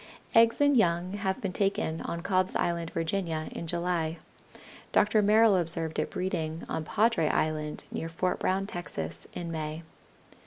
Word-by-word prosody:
Eggs 230 0 +5
and 285 -1 +4
young 180 -4 +2
have 195 -2 -1
been 195 -3 -2
taken 195 -5 0
on 170 - -4
Cobb's 185 -1 +1
Island, 170 -1 0
Virginia, 165 -2 -2
in 170 - -6
July. 170 -1 -1 0.7
Dr. 210 +1 +4
Merrill 215 0 +5
observed 165 -2 +1
it - - -1
breeding 165 -3 -3
on 160 - -3
Padre 215 -1 +2
Island, 155 0 -1
near 165 - -4
Fort 180 +3 -1
Brown, 190 +1 0
Texas, 85 - -5
in 170 -1 -5
May. 155 0 -4
175 Hz, 150 wpm, -29 LUFS, 160-195 Hz, 0.7 s, Eggs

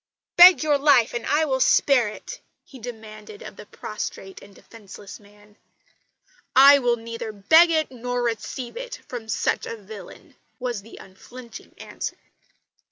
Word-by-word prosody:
"Beg 355 -1 +8
your 295 -2 +1
life, 275 -5 +3
and 240 - -5
I 305 +2 +2
will 265 -3 -1
spare 260 -2 +3
it," 210 - -9 0.3
he 265 - -14
demanded 215 -3 -11
of - - -10
the 210 +1 -13
prostrate 195 -3 -8
and 200 -1 -17
defenceless 205 -2 -13
man. 205 0 -22 1.0
"I 280 +2 +8
will 245 -2 +1
neither 230 -1 -7
beg 320 - +4
it, 315 -4 0
nor 245 0 -4
receive 235 +2 -5
it - - -8
from 230 -3 -8
such - - -1
a 230 - -6
villain," 205 0 -13 0.2
was 245 -5 -4
the 225 +3 -15
unflinching 235 +6 -13
answer. - - -7
235 Hz, 150 wpm, -23 LUFS, 210-270 Hz, 1.0 s, Beg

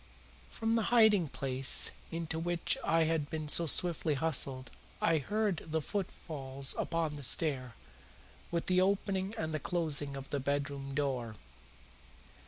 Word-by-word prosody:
From 225 0 -1
the 225 -2 +1
hiding 220 -7 +5
place 130 0 +2 0.2
into 165 -1 -4
which 170 0 +2
I 165 0 +3
had 160 -2 0
been 155 -1 -4
so 165 +3 +3
swiftly 160 -1 +2
hustled 135 -3 +1 0.3
I 165 -1 +3
heard 205 +3 0
the 160 0 -3
footfalls 140 -7 -4
upon 165 -3 -2
the 145 - -8
stair, 130 -3 +1 0.7
with 170 -1 -2
the 185 0 +3
opening 195 +1 0
and 160 -5 -3
the 155 - -1
closing 145 -4 -2
of 135 0 -8
the 145 - 0
bedroom 140 0 -3
door. 130 -6 -2
160 Hz, 140 wpm, -32 LUFS, 140-175 Hz, 0.7 s, hiding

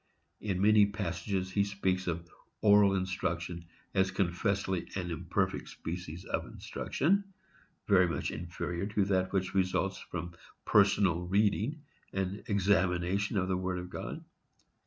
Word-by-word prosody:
In 95 -3 -1
many 105 -1 +6
passages 95 -1 -2
he 100 +1 +2
speaks 95 -2 -1
of 85 0 -2 0.3
oral 100 -1 +6
instruction 85 -2 -2 0.3
as 95 0 +3
confessedly 95 0 0
an 90 -2 -3
imperfect 80 - -1
species 85 0 -6
of - - -2
instruction, 200 +6 0 0.6
very 95 -3 +5
much 85 - -2
inferior 85 +3 -4
to 105 -1 +1
that 95 -1 +1
which 95 -2 -1
results 95 0 +1
from 85 0 -6 0.3
personal 100 -4 +4
reading 105 - +1 0.3
and 95 +1 -2
examination 95 0 +2
of 95 -1 +1
the 95 -1 +1
Word 95 0 -2
of 90 0 -6
God. - - -6
95 Hz, 130 wpm, -31 LUFS, 90-100 Hz, 0.6 s, many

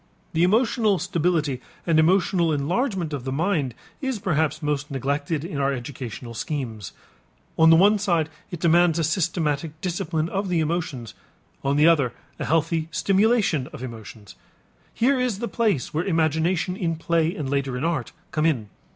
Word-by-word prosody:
The 160 - +1
emotional 215 +2 +3
stability 170 -7 0 0.2
and 165 -2 +3
emotional 175 0 +3
enlargement 175 - -1
of 140 -4 -4
the 130 - -3
mind 150 - 0 0.3
is 265 -4 -1
perhaps 160 -5 0
most 145 -1 -1
neglected 145 +3 -2
in 170 -5 -4
our 140 0 +2
educational 120 -2 -6
schemes. 115 - -4 0.6
On 160 0 +6
the 165 - +8
one 205 +5 +5
side 170 -6 +1 0.2
it 175 -4 -6
demands 170 0 +4
a 165 - +1
systematic 155 -2 -1
discipline 170 -3 -2
of 195 0 -2
the 175 -2 +1
emotions, 155 - -2 0.5
on 140 +1 +1
the 150 +2 +5
other 145 -8 +3 0.3
a - - -2
healthy 160 0 +1
stimulation 195 - +2
of - - -9
emotions. 110 -4 -9 0.6
Here 260 +3 +2
is 250 -5 0
the 235 +3 -3
place 215 - 0
where 160 +3 0
imagination 165 +1 +1
in 170 -4 -1
play 165 0 0
and 150 - -4
later 135 -2 -1
in 125 - -4
art 160 -8 -1 0.2
come 155 +1 +1
in. 120 -10 -1
160 Hz, 160 wpm, -24 LUFS, 140-180 Hz, 0.6 s, the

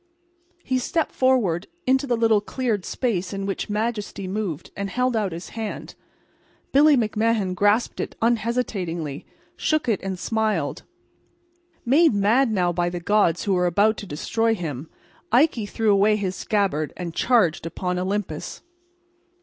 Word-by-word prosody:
He 255 -1 0
stepped 320 +6 -1
forward 220 -9 +1 0.2
into 265 +1 +2
the 240 -2 +1
little 225 -2 +3
cleared 220 -3 -2
space 200 -7 -2
in 195 0 -3
which 195 +1 -3
majesty 210 -2 -3
moved, 190 -6 -4
and 200 0 -3
held 250 +2 0
out 210 -4 0
his 170 +2 -7
hand. 220 -2 -6 0.8
Billy 290 +1 +6
McMahan 220 -3 +1
grasped 205 +5 +1
it - - -4
unhesitatingly, 215 - -1 0.3
shook 310 -4 0
it 220 -5 +1
and 190 -1 -4
smiled. 210 - -1 1.0
Made 285 +1 +4
mad 225 +5 +3
now 180 -4 +1
by 175 0 0
the 175 0 -4
gods 180 -2 +2
who 200 - +1
were 180 -1 +2
about 205 +5 +3
to 205 - -7
destroy 225 +9 0
him, 155 - -5 0.4
Ikey 240 -3 +3
threw 220 +1 +1
away 205 +2 +4
his 190 -3 -2
scabbard 195 -10 -1
and 170 -2 -5
charged 190 -10 +2
upon 180 +1 -3
Olympus. 185 -4 -3
205 Hz, 145 wpm, -23 LUFS, 180-230 Hz, 1.0 s, Billy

